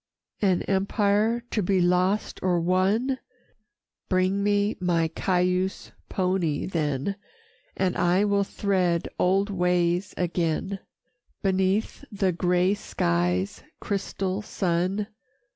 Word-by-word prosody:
III 200 Hz, -, +4 dB
"An 180 Hz, -, +2 dB
empire 205 Hz, +4 st, +1 dB
to 215 Hz, -, +1 dB
be 190 Hz, 0 st, +2 dB
lost 180 Hz, +3 st, +1 dB
or 180 Hz, -2 st, +2 dB
won? 195 Hz, +10 st, +1 dB, 0.9 s
Bring 185 Hz, +1 st, +2 dB
me 205 Hz, +1 st, +1 dB
my 170 Hz, -3 st, +1 dB
Cayuse 180 Hz, +2 st, 0 dB, 0.2 s
pony 180 Hz, -5 st, 0 dB
then, 155 Hz, +1 st, -1 dB, 0.6 s
And 185 Hz, -2 st, +1 dB
I 180 Hz, +3 st, +3 dB
will 200 Hz, -1 st, +2 dB
thread 185 Hz, -4 st, 0 dB
old 195 Hz, +3 st, +2 dB
ways 180 Hz, 0 st, +1 dB
again, 175 Hz, +2 st, -1 dB, 0.6 s
Beneath 190 Hz, +5 st, 0 dB
the 195 Hz, -2 st, +1 dB
gray 180 Hz, +2 st, +2 dB
skies' 90 Hz, -, -1 dB, 0.2 s
crystal 195 Hz, -1 st, -2 dB
sun. 185 Hz, 0 st, -1 dB
185 Hz, 105 wpm, -26 LUFS, 175-200 Hz, 0.9 s, III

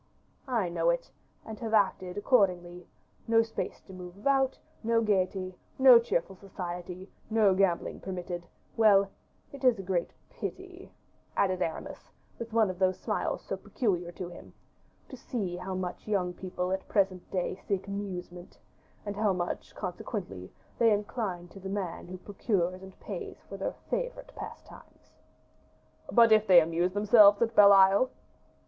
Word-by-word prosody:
"I 230 Hz, -7 st, 0 dB
know 170 Hz, -1 st, 0 dB
it, 170 Hz, 0 st, -1 dB, 0.3 s
and 220 Hz, -1 st, -8 dB
have 225 Hz, -2 st, -1 dB
acted 190 Hz, -2 st, +1 dB
accordingly; 180 Hz, -6 st, +1 dB, 0.4 s
no 225 Hz, 0 st, +4 dB
space 225 Hz, -, -5 dB
to 190 Hz, -, -13 dB
move 180 Hz, 0 st, -10 dB
about, 270 Hz, +4 st, +1 dB, 0.2 s
no 230 Hz, 0 st, +2 dB
gayety, 190 Hz, -3 st, 0 dB, 0.2 s
no 260 Hz, -3 st, +9 dB
cheerful 195 Hz, -4 st, -2 dB
society, 180 Hz, -1 st, -7 dB, 0.2 s
no 215 Hz, -3 st, +4 dB
gambling 185 Hz, -2 st, 0 dB
permitted: 180 Hz, -2 st, -6 dB, 0.3 s
well, 200 Hz, -3 st, +5 dB, 0.4 s
it 280 Hz, -1 st, -11 dB
is 250 Hz, -3 st, +5 dB
a 195 Hz, -, -6 dB
great 180 Hz, -2 st, -1 dB, 0.2 s
pity," 375 Hz, 0 st, -8 dB, 0.5 s
added 185 Hz, -2 st, +1 dB
Aramis, 160 Hz, -2 st, -5 dB, 0.3 s
with 230 Hz, -1 st, -6 dB
one 220 Hz, -3 st, +3 dB
of 180 Hz, -, -11 dB
those 185 Hz, -1 st, +2 dB
smiles -, -, -2 dB
so -, -, -4 dB
peculiar 180 Hz, -7 st, -2 dB
to 180 Hz, +1 st, -6 dB
him, 175 Hz, -, -13 dB, 0.5 s
"to -, -, -9 dB
see 210 Hz, -7 st, -4 dB
how 185 Hz, +1 st, -5 dB
much 185 Hz, +1 st, -5 dB
young 185 Hz, -4 st, 0 dB
people 180 Hz, 0 st, -4 dB
at 190 Hz, -, 0 dB
the -, -, -25 dB
present 190 Hz, -3 st, 0 dB
day 180 Hz, -2 st, -1 dB
seek 195 Hz, 0 st, -3 dB
amusement, 180 Hz, -3 st, -6 dB, 0.5 s
and 205 Hz, 0 st, -4 dB
how 210 Hz, -1 st, +2 dB
much, 175 Hz, -1 st, -4 dB
consequently, 180 Hz, -, -6 dB, 0.3 s
they 230 Hz, -1 st, +5 dB
incline 205 Hz, -4 st, -2 dB
to 195 Hz, -, -12 dB
the 190 Hz, 0 st, -7 dB
man 190 Hz, -4 st, -4 dB
who 185 Hz, +1 st, -7 dB
procures 185 Hz, -2 st, -2 dB
and 190 Hz, 0 st, -13 dB
pays -, -, -7 dB
for -, -, -8 dB
their -, -, -3 dB, 0.2 s
favorite -, -, -3 dB
pastimes." -, -, -12 dB, 1.0 s
"But 230 Hz, -2 st, +6 dB
if 215 Hz, 0 st, +5 dB
they 180 Hz, -2 st, +9 dB
amuse 170 Hz, +2 st, 0 dB
themselves 205 Hz, 0 st, +6 dB
at 230 Hz, 0 st, -1 dB
Bell 205 Hz, -2 st, +8 dB
Isle?" 195 Hz, +5 st, +6 dB
195 Hz, 155 wpm, -29 LUFS, 180-220 Hz, 1.0 s, no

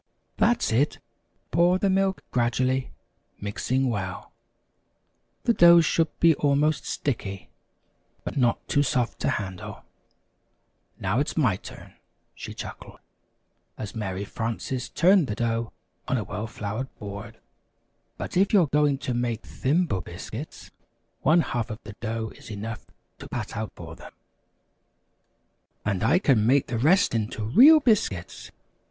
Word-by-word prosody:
That's 240 Hz, -, +2 dB
it 130 Hz, +7 st, +2 dB, 0.5 s
pour 175 Hz, +2 st, +4 dB
the 200 Hz, -, +1 dB
milk 195 Hz, 0 st, +1 dB
gradually, 130 Hz, +2 st, +1 dB, 0.5 s
mix 100 Hz, 0 st, -5 dB
well 115 Hz, -8 st, -1 dB, 1.1 s
the 235 Hz, -, +3 dB
dough 170 Hz, -3 st, +8 dB
should 165 Hz, 0 st, +2 dB
be 165 Hz, -1 st, +6 dB
almost 145 Hz, +1 st, +1 dB
sticky, 100 Hz, -8 st, -3 dB, 0.7 s
but -, -, -5 dB
not 120 Hz, -4 st, +1 dB
too 145 Hz, -, +2 dB
soft 125 Hz, -3 st, 0 dB
to -, -, 0 dB
handle. 95 Hz, -3 st, -5 dB, 1.2 s
Now 100 Hz, +6 st, 0 dB
it's 145 Hz, -, -2 dB
my 125 Hz, -, +3 dB
turn," -, -, -12 dB, 0.4 s
she -, -, -8 dB
chuckled, -, -, -9 dB, 0.8 s
as 105 Hz, -, -6 dB
Mary 100 Hz, -3 st, -4 dB
Frances 115 Hz, +4 st, -4 dB
turned 180 Hz, -1 st, +4 dB
the 105 Hz, -, -3 dB
dough 115 Hz, 0 st, -1 dB, 0.4 s
on 130 Hz, -, +1 dB
a 110 Hz, -, -2 dB
well 105 Hz, +3 st, -5 dB
floured 110 Hz, +5 st, -5 dB
board. 105 Hz, +2 st, -8 dB, 0.8 s
"But -, -, -6 dB
if 195 Hz, +4 st, +3 dB
you 195 Hz, -4 st, +6 dB
are 140 Hz, -, -5 dB
going 145 Hz, -2 st, +3 dB
to 130 Hz, -, -3 dB
make 120 Hz, -2 st, -2 dB
Thimble 145 Hz, -, 0 dB
Biscuits, 110 Hz, -, -8 dB, 0.5 s
one 170 Hz, +2 st, +4 dB
half 120 Hz, -6 st, -2 dB
of 110 Hz, -, -5 dB
the 105 Hz, -, -9 dB
dough 110 Hz, 0 st, -3 dB
is -, -, -13 dB
enough 110 Hz, +2 st, -6 dB, 0.3 s
to -, -, -10 dB
pat -, -, -5 dB
out -, -, -4 dB
for -, -, -9 dB
them -, -, -13 dB, 0.9 s
" 65 Hz, 0 st, -46 dB
"And 100 Hz, -2 st, -1 dB
I 135 Hz, +10 st, +4 dB
can 135 Hz, -, +3 dB
make 135 Hz, +2 st, +4 dB
the 115 Hz, -2 st, -3 dB
rest 175 Hz, -, +4 dB
into 110 Hz, -1 st, -2 dB
real 260 Hz, -, +7 dB
biscuits! 205 Hz, -, 0 dB
125 Hz, 140 wpm, -26 LUFS, 110-155 Hz, 1.2 s, dough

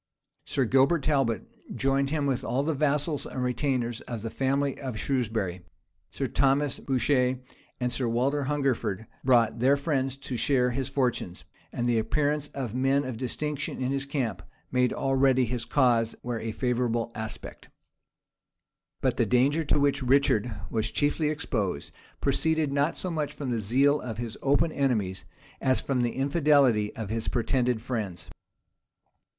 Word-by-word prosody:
Sir 135 Hz, -, 0 dB
Gilbert 135 Hz, +6 st, +3 dB
Talbot 135 Hz, -8 st, -1 dB
joined 135 Hz, 0 st, +1 dB
him 150 Hz, -1 st, 0 dB
with 135 Hz, -3 st, 0 dB
all 125 Hz, +4 st, 0 dB
the 160 Hz, +2 st, 0 dB
vassals 150 Hz, +1 st, +1 dB
and 130 Hz, -, -4 dB
retainers 125 Hz, -2 st, -1 dB
of 115 Hz, -3 st, -5 dB
the 115 Hz, -, -4 dB
family 135 Hz, +1 st, 0 dB
of 130 Hz, -5 st, -5 dB
Shrewsbury: 110 Hz, -9 st, -1 dB, 0.5 s
Sir -, -, -3 dB
Thomas 140 Hz, +1 st, +1 dB
Bourchier 130 Hz, -1 st, +1 dB, 0.4 s
and 125 Hz, -1 st, 0 dB
Sir 120 Hz, 0 st, -1 dB
Walter 135 Hz, +5 st, +1 dB
Hungerford 130 Hz, -7 st, -1 dB, 0.2 s
brought 115 Hz, -3 st, +3 dB
their 135 Hz, +4 st, +4 dB
friends 135 Hz, -3 st, -1 dB
to 135 Hz, -2 st, -5 dB
share 125 Hz, 0 st, +2 dB
his 130 Hz, +1 st, -2 dB
fortunes; 125 Hz, -10 st, -1 dB, 0.3 s
and 120 Hz, -, -2 dB
the 120 Hz, -2 st, +2 dB
appearance 145 Hz, +6 st, 0 dB
of 130 Hz, -6 st, -5 dB
men 135 Hz, +2 st, +2 dB
of 130 Hz, -3 st, -4 dB
distinction 150 Hz, +4 st, -3 dB
in 130 Hz, 0 st, -1 dB
his 135 Hz, 0 st, -2 dB
camp 135 Hz, -5 st, -2 dB, 0.3 s
made 125 Hz, -1 st, +2 dB
already 135 Hz, -1 st, +2 dB
his 120 Hz, 0 st, -3 dB
cause 120 Hz, -5 st, +2 dB
wear 120 Hz, -1 st, -3 dB
a 115 Hz, 0 st, -3 dB
favorable 120 Hz, -1 st, -1 dB
aspect. 110 Hz, -1 st, -7 dB, 1.3 s
But -, -, +1 dB
the -, -, +2 dB
danger 140 Hz, +6 st, +3 dB
to 145 Hz, -, +2 dB
which 145 Hz, 0 st, +2 dB
Richard 125 Hz, -3 st, +2 dB, 0.2 s
was 110 Hz, 0 st, 0 dB
chiefly 150 Hz, +1 st, +1 dB
exposed, 120 Hz, -, -2 dB, 0.3 s
proceeded 160 Hz, -3 st, +1 dB
not 145 Hz, +3 st, +1 dB
so 185 Hz, -, -3 dB
much 155 Hz, -3 st, -2 dB
from 135 Hz, -4 st, -4 dB
the 115 Hz, -, 0 dB
zeal 135 Hz, +8 st, +3 dB
of 115 Hz, -4 st, -5 dB
his 115 Hz, -1 st, -4 dB
open 145 Hz, +4 st, +2 dB
enemies, 110 Hz, -11 st, -1 dB, 0.4 s
as 130 Hz, -1 st, +2 dB
from 130 Hz, -3 st, -1 dB
the 120 Hz, -1 st, 0 dB
infidelity 140 Hz, -6 st, +3 dB
of 110 Hz, -2 st, -5 dB
his 115 Hz, 0 st, -3 dB
pretended 125 Hz, -1 st, 0 dB
friends. 105 Hz, -10 st, -4 dB
130 Hz, 155 wpm, -27 LUFS, 120-140 Hz, 1.3 s, their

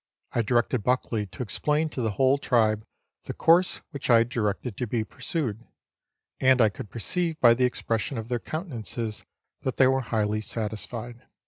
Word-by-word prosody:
I 120 Hz, -, +1 dB
directed 120 Hz, +1 st, +1 dB
Buckley 115 Hz, -2 st, 0 dB
to 110 Hz, -, -6 dB
explain 150 Hz, +8 st, 0 dB
to 135 Hz, -, -4 dB
the 110 Hz, -3 st, 0 dB
whole 135 Hz, +5 st, +3 dB
tribe 110 Hz, -5 st, +2 dB, 0.4 s
the -, -, -5 dB
course 175 Hz, +3 st, +4 dB
1 -, -, -15 dB
which 140 Hz, -3 st, -5 dB
I 120 Hz, -, +8 dB
had 115 Hz, +1 st, +2 dB
directed 110 Hz, 0 st, -2 dB
to 125 Hz, -, -2 dB
be 110 Hz, 0 st, 0 dB
pursued, 120 Hz, -, -3 dB, 0.8 s
and 130 Hz, 0 st, +5 dB
I 110 Hz, -3 st, +6 dB
could 100 Hz, +1 st, -9 dB
perceive 165 Hz, -, -2 dB
by 120 Hz, -2 st, +7 dB
the 125 Hz, +2 st, +2 dB
expression 115 Hz, 0 st, -1 dB
of 110 Hz, 0 st, -5 dB
their 120 Hz, 0 st, -1 dB
countenances 115 Hz, -, -5 dB, 0.4 s
that 130 Hz, -, -3 dB
they 130 Hz, -, +6 dB
were 130 Hz, +1 st, +3 dB
highly 110 Hz, -3 st, 0 dB
satisfied. 115 Hz, +2 st, -5 dB
120 Hz, 180 wpm, -26 LUFS, 110-130 Hz, 0.8 s, I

